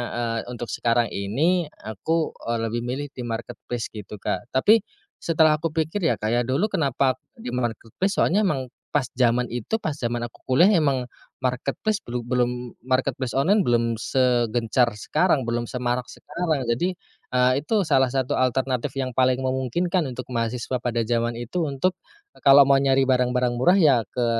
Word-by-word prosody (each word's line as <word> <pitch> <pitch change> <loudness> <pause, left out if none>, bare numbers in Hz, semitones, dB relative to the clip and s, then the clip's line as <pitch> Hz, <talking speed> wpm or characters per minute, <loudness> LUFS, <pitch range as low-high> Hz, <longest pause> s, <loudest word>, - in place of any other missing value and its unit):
eee, 115 -1 -1
untuk 120 -3 -6
sekarang 115 -1 +1
ini 155 - 0 0.2
aku, 160 - -1 0.2
eee, 115 -1 0
lebih 115 +1 -2
milih 130 +5 -4
di 125 - -7
marketplace 115 0 -5
gitu, 105 -1 -8
Kak. 105 - -3
Tapi, 215 +12 +5 0.4
setelah 155 -2 +3
aku 165 - -1
pikir 160 +5 -1
ya, 120 - +2
Kak, 110 +2 -2
ya, 120 - +2
dulu, 175 +12 0
"Kenapa 135 -3 +1 0.2
di 125 - -7
marketplace?" 120 - -2
Soalnya 190 +5 +3
emang 130 -6 -2 0.2
pas 145 -4 +1
zaman 125 -1 +2
itu 120 - -3
pas 155 -8 -3
zaman 120 -3 -2
aku 115 - -23
kuliah 135 +8 +4
emang 135 -6 +1 0.3
marketplace 140 - -2
belu 120 0 -5
belum 125 -1 -1
marketplace 130 -1 -1
online 190 +10 +3
belum 115 -4 +1
segencar 120 -1 +1
sekarang, 150 - +1
belum 120 0 -1
semarak 125 +1 -2
sekarang. 160 -7 -3
Jadi, 125 +11 +1 0.4
eee, 125 0 +3
itu 220 - -1
salah 130 -2 +3
satu 130 -2 0
alternatif 130 -1 0
yang 130 -2 -3
paling 130 0 +3
memungkinkan 130 +5 -1
untuk 125 0 -7
mahasiswa 120 +2 -2
pada 120 -1 0
zaman 120 0 0
itu, 130 +9 -2
untuk, 155 +5 0 0.4
eee, - - -20
kalau 140 0 +8
mau 140 - +5
nyari 135 -1 +3
barang-barang 125 -1 +2
murah 175 +10 +4
ya 150 -7 +6 0.2
ke 125 -1 -1
125 Hz, 165 wpm, -24 LUFS, 120-145 Hz, 0.4 s, kalau